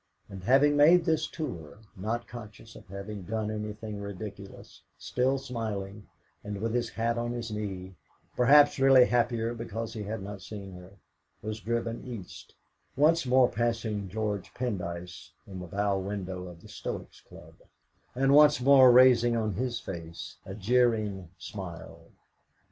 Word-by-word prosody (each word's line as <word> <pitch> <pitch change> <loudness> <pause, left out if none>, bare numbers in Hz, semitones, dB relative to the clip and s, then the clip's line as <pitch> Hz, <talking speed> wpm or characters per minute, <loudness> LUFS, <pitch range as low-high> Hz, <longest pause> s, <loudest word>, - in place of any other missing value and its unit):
And 95 -2 -9
having 140 +4 +5
made 165 +4 +6
this 160 -1 +1
tour, 90 - -6 0.2
not 115 +5 -3
conscious 110 -1 -11
of - - -14
having 100 +2 -7
done 110 +3 -3
anything 105 0 -5
ridiculous, 100 0 -9 0.2
still 130 +2 0
smiling, 105 -5 -5 0.4
and 105 -1 -5
with 115 +2 -2
his 120 -1 0
hat 115 +1 -1
on 120 0 -2
his 120 -2 -5
knee, 95 -3 -5 0.4
perhaps 145 +3 +6
really 135 -2 +7
happier 120 -1 0
because 115 -1 -5
he 110 - -5
had 105 0 -5
not 100 0 -7
seen 100 0 -8
her, 90 +1 -12 0.5
was 110 +1 -4
driven 115 +1 -3
East, 115 -8 -9 0.4
once 155 +1 +3
more 130 0 +5
passing 115 -4 -2
George 105 -1 -3
Pendyce 90 -7 -5
in 95 -2 -8
the 90 - -7
bow 100 +2 0
window 95 -2 -5
of 85 -2 -12
the - - -12
Stoics' - - -7
Club, - - -15 0.6
and 135 +2 +3
once 150 -2 +7
more 130 -1 +7
raising 120 -2 +6
on 110 -2 -1
his 120 +3 -2
face 85 -3 -8
a 95 - -6
jeering 105 -4 +1
smile. 90 -5 -9
110 Hz, 150 wpm, -29 LUFS, 100-125 Hz, 0.6 s, really